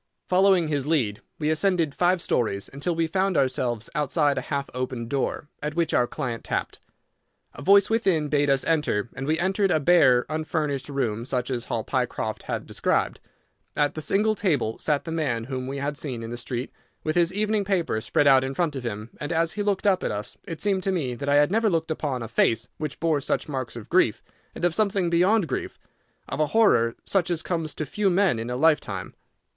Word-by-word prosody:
Following 185 -2 +4
his 145 -2 -1
lead, 120 -10 0 0.2
we 155 0 0
ascended 165 -2 +1
five 180 +1 +2
stories, 100 -5 -1
until 155 +5 -2
we 165 0 +1
found 190 +2 0
ourselves 120 -4 0
outside 150 -1 +1
a - - -1
half 140 -1 -1
opened 125 -2 -4
door, 140 +1 -1
at 150 +1 -3
which 170 -2 0
our 120 - +3
client 120 -2 -4
tapped. - - -3 0.7
A - - -10
voice 200 +1 +6
within 190 -9 +1
bade 145 -1 +1
us 135 -1 +3
enter, 150 -9 0
and 135 0 -5
we 155 +1 +2
entered 195 +3 +1
a 160 - +3
bare, 135 -6 +5
unfurnished 155 -3 -2
room 120 -6 -1
such 125 0 -2
as 120 -2 -2
Hall - - -2
Pycroft - - -2
had - - -2
described. - - 0 0.6
At 145 -1 +1
the 155 - -5
single 210 +7 +2
table 150 - 0
sat 150 -2 0
the 165 - -6
man 140 -8 -1
whom 130 +1 -4
we 135 +1 -4
had 145 +1 -3
seen 125 -6 -4
in 115 - -6
the - - -3
street, 120 +1 -4 0.3
with 155 - -1
his 175 0 +3
evening 210 +1 0
paper 180 - 0
spread 125 +5 +1
out 135 -2 +6
in 135 +1 -4
front 165 -3 0
of 130 - -5
him, 110 -1 -5
and 150 - -4
as 165 -1 +1
he 210 - -4
looked 205 -1 0
up 195 -2 +3
at - - 0
us 105 0 -3
it 165 -5 -6
seemed 195 -2 +1
to 195 - 0
me 150 -9 -1
that 140 +4 -4
I 145 - +4
had 145 +3 +4
never 225 +1 +3
looked 165 -3 -1
upon 140 -6 -2
a - - -5
face 115 0 +1
which 155 -2 -4
bore 160 -3 +1
such - - -1
marks 130 -5 -4
of 115 -3 -8
grief, - - +2 0.3
and - - -1
of 175 - +2
something 195 -3 +1
beyond 185 +3 +3
grief—of - - -7
a 155 - +3
horror 120 - +3
such 185 -2 +1
as 170 -2 -1
comes 165 -3 -2
to 155 - -3
few 200 +7 0
men 180 - +2
in 115 +1 -4
a 125 - -2
lifetime. 155 +3 +1
150 Hz, 215 wpm, -25 LUFS, 130-175 Hz, 0.7 s, voice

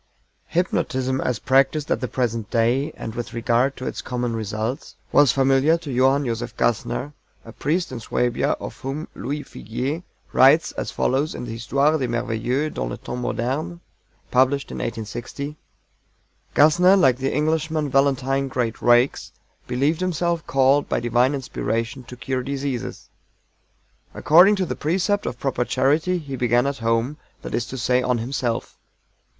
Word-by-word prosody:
Hypnotism 130 -6 0
as 125 -3 -1
practiced 135 +4 +2
at - - +1
the 125 - -1
present 115 -3 -2
day, 120 +5 +1
and 110 - -6
with 120 0 -6
regard 120 +3 +1
to 130 - -6
its - - -4
common 120 -2 -3
results, 110 +3 -4 0.2
was 145 -2 +6
familiar 135 +4 +3
to 150 -6 -6
JOHANN 135 +3 +3
JOSEPH 120 0 -4
GASSNER, 120 +4 -1 0.3
a 115 - -10
priest 165 +9 -1
in 120 - -5
Suabia, 120 +1 0
of - - -8
whom 140 +4 -4
LOUIS 145 +3 -5
FIGUIER 130 - -4 0.3
writes 140 +5 +5
as - - -4
follows 140 +4 0
in - - -5
his 115 - -6
Histoire 145 +5 +2
du 130 - -1
Merveilleux 120 +5 -1
dans - - -3
les - - -5
Temps 125 - -6
Modernes, 145 +9 -2 0.5
published 130 +2 +2
in - - -6
1860: 120 +6 -5 1.0
"GASSNER, 175 +6 +6
like 130 -9 +4
the 135 +1 -1
Englishman 155 +1 0
VALENTINE 135 0 +1
GREAT 120 -4 -2
RAKES, 120 +2 +3 0.3
believed 140 +7 0
himself 170 -2 -1
called 135 +2 +3
by - - +1
divine 120 +4 +2
inspiration 115 -1 -3
to 125 - -10
cure 130 +2 -2
diseases. 135 -2 -4 1.1
According 180 +7 +6
to 190 -2 -1
the - - -4
precept 190 +6 0
of 120 - -5
proper 135 -3 0
charity 155 +9 +1
he 145 -5 -6
began 120 0 +2
at 140 -1 -2
home 115 +5 0 0.3
that - - -6
is 120 - -1
to 130 - -6
say 125 +1 +2
on 125 -1 +1
himself. 120 0 -3
130 Hz, 155 wpm, -23 LUFS, 120-145 Hz, 1.1 s, was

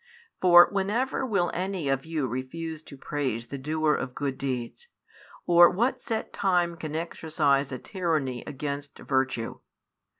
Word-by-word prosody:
For 175 -1 +8
whenever 220 +7 0
will 195 -6 +1
any 185 -3 -2
of 135 +2 -1
you 160 -4 -1
refuse 150 +6 -5
to 140 -3 -13
praise 130 -5 -3
the 140 +3 -7
doer 155 +2 +1
of 125 - -3
good 140 -2 -2
deeds, 130 - -4 0.6
or 175 0 +7
what 235 +8 0
set 225 -2 -3
time 175 -3 +1
can 155 -2 -6
exercise 155 -4 0
a 130 - -3
tyranny 155 - -2
against 145 0 -5
virtue? 130 -4 -1
155 Hz, 140 wpm, -27 LUFS, 135-175 Hz, 0.6 s, For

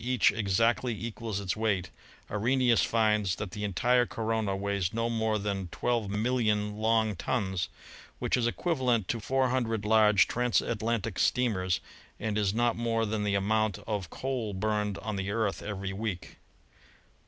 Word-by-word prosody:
each 125 -2 +3
exactly 115 +4 +1
equals 115 -2 -4
its 95 -3 -2
weight, 100 -5 -1 0.4
Arrhenius 120 +3 +3
finds 105 -4 +2
that 105 -3 -5
the 105 +3 -5
entire 120 +5 +2
corona 110 -3 -1
weighs 100 -1 -1
no 115 +1 0
more 110 -1 +1
than 100 -2 -2
12,000,000 105 0 0
long 110 -1 +2
tons, 95 -2 -1 0.5
which - - 0
is 120 -2 +1
equivalent 125 - 0
to 115 - -1
four 130 +3 +1
hundred 115 -5 -1
large 105 -2 +5
trans 125 -1 +2
atlantic 115 -2 -2
steamers, 95 -8 +1 0.4
and 110 -2 -2
is 105 -2 +2
not 120 +2 +1
more 115 -1 0
than 105 0 -2
the 100 -1 +1
amount 110 0 +1
of 100 -6 -3
coal 125 -5 -3
burned 105 0 -1
on 110 -2 -3
the 95 0 -2
Earth 105 -1 -1
every 100 -1 -4
week. 100 -3 -5
110 Hz, 150 wpm, -29 LUFS, 100-115 Hz, 0.5 s, large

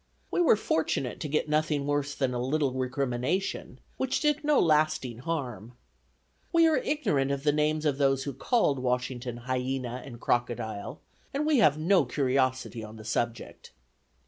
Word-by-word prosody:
We - - +1
were 335 - +6
fortunate 160 - -1
to - - -3
get 150 +1 0
nothing 150 -1 0
worse 145 0 -1
than 130 -2 0
a 120 - -2
little 140 +2 +1
recrimination, 130 +5 -2 0.2
which 265 0 0
did 300 0 +1
no 295 -1 +4
lasting 155 -7 +2
harm. 125 - -4 0.8
We 335 -2 +5
are 320 -2 +4
ignorant 225 - 0
of 140 0 -2
the 150 - +4
names 150 +1 0
of 145 -2 +1
those 135 -1 +2
who 140 - -4
called 150 - +1
Washington 125 -1 -2
hyena 130 -1 -2
and 120 -4 -10
crocodile, 115 -4 -2 0.3
and 295 +2 0
we 305 -4 +3
have 150 -9 +5
no 170 0 +3
curiosity 130 -2 0
on 110 0 -9
the 110 - -11
subject. 115 +1 -3
140 Hz, 160 wpm, -28 LUFS, 125-155 Hz, 0.8 s, were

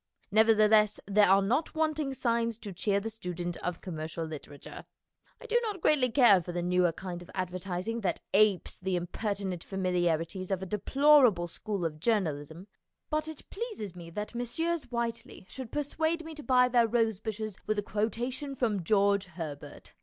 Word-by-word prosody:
Nevertheless 215 -1 +5
there 205 -1 +4
are 195 +1 +5
not 260 +12 0
wanting 310 -3 0
signs 230 -2 0
to 210 -4 -8
cheer 200 +3 +1
the 225 +2 -5
student 175 -5 -5
of 180 -1 -4
commercial 160 -1 -5
litera 150 -2 -8
ture. - - -10 0.5
I - - -12
do 475 +1 +2
not 425 -5 -3
greatly 285 -6 +3
care 225 -7 +6
for 175 - -6
the 175 0 -2
newer 180 -1 +3
kind 175 +1 -7
of 175 - -13
advertising 185 +4 -3
that 195 - -1
apes 205 -2 +3
the 185 0 -1
impertinent 185 0 -3
familiarities 180 -1 -1
of 190 -1 -1
a - - -3
deplorable 235 -1 +4
school 195 +1 -4
of 155 -2 -3
journalism, 165 -5 -1 0.5
but 310 0 0
it 315 -2 -9
pleases 405 - -5
me 170 -1 -9
that 210 +7 -5
Messrs. 320 +7 -2
Whiteley 230 -4 -4
should 255 +2 -7
persuade 315 +3 -1
me 320 - -7
to 305 - -9
buy 250 -3 +4
their 240 -2 +3
rose 225 -3 +1
bushes 215 -2 -4
with 215 - 0
a 205 - 0
quotation 240 +7 -2
from 215 -7 0
George 200 +1 +3
Herbert. 160 -5 -8
210 Hz, 170 wpm, -30 LUFS, 180-245 Hz, 0.5 s, care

